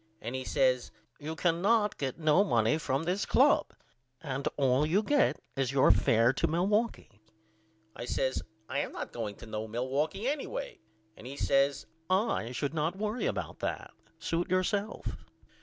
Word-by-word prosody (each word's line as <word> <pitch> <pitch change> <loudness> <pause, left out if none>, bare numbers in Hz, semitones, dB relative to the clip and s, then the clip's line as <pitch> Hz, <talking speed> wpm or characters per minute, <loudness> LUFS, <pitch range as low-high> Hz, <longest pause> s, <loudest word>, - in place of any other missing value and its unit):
And 115 +3 -5
he 130 0 -3
says 130 -1 +1 0.3
You 155 +2 -5
cannot 195 +6 +2
get 135 -3 -2
no 155 +3 +4
money 115 - +2
from 140 -2 -1
this 180 +4 0
club - - +4 0.5
and 135 -3 -3
all 135 0 +3
you 180 +8 +2
get 290 +5 +2 0.2
is 135 -2 0
your 135 -5 +5
fair 115 +5 +4
to - - +1
Milwaukee. 195 - -1 0.7
I - - -6
says 130 +1 -1 0.3
I 140 +3 -2
am - - -3
not - - -6
going 110 -4 -4
to - - -12
no 110 0 -4
Milwaukee 135 - -1
anyway - - -3 0.4
and 115 - -11
he 140 +2 -7
says 140 0 +2 0.2
I 190 - +1
should 140 +3 -2
not 160 +4 -1
worry 215 +3 -1
about - - -4
that. - - -4 0.3
Suit 170 +1 -2
yourself. 200 +3 -1
145 Hz, 155 wpm, -30 LUFS, 130-190 Hz, 0.7 s, your